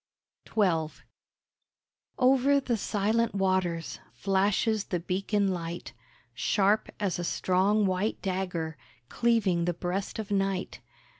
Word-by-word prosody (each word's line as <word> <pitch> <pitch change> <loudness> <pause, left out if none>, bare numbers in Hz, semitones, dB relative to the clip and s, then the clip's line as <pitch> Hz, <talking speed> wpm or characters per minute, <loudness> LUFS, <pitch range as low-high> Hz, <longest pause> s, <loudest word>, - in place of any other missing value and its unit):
XII 165 -7 +1 1.1
Over 270 +2 +4
the 255 -3 -1
silent 220 +2 0
waters 185 -4 0
Flashes 200 +2 +1
the 175 - -2
beacon 195 +3 0
light, 175 -2 -4 0.4
Sharp 205 - +2
as 195 -4 -1
a - - -2
strong, 190 +4 +2
white 185 +3 0
dagger 180 -5 -2 0.3
Cleaving 210 -8 +2
the 175 -1 -1
breast 180 +3 -3
of 215 -2 -5
Night. 195 -1 -1
195 Hz, 105 wpm, -28 LUFS, 180-215 Hz, 1.1 s, Over